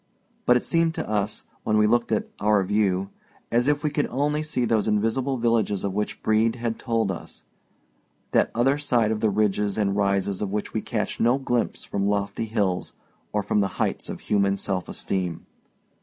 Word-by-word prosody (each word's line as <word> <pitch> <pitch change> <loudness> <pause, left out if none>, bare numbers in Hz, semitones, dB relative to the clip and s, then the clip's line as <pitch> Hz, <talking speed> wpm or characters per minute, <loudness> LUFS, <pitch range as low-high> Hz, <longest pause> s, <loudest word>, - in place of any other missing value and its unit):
But 125 - +6
it - - -3
seemed 165 -1 +1
to - - -3
us, 105 -1 -1 0.2
when 110 - +2
we 105 - +5
looked 120 +2 +2
at 110 - 0
"our 105 -1 +3
view," 100 -1 +1 0.4
as 120 +2 +3
if 145 0 +2
we 150 - +1
could 150 0 0
only 150 +3 0
see 150 -5 -1
those 110 -2 +1
invisible 115 +6 +1
villages 115 -4 +1
of 100 -1 -1
which 105 +1 -3
Brede 110 +1 +3
had 115 -2 -3
told 115 -4 0
us—that 60 -7 -5
other 135 +5 +3
side 120 -7 +2
of 110 - -1
the 110 - +2
ridges 105 0 +1
and 100 -2 +1
rises 100 -1 +1
of 105 - -1
which 105 0 -3
we - - -1
catch - - -3
no 120 +3 +4
glimpse 125 -3 -1
from 100 0 -1
lofty 100 +2 -1
hills 105 -5 -1 0.4
or 105 -1 0
from 105 - +1
the 100 - +2
heights - - -1
of - - -6
human 100 -1 +1
self 95 -2 -3
esteem. 90 -4 -3
105 Hz, 185 wpm, -25 LUFS, 100-120 Hz, 0.4 s, But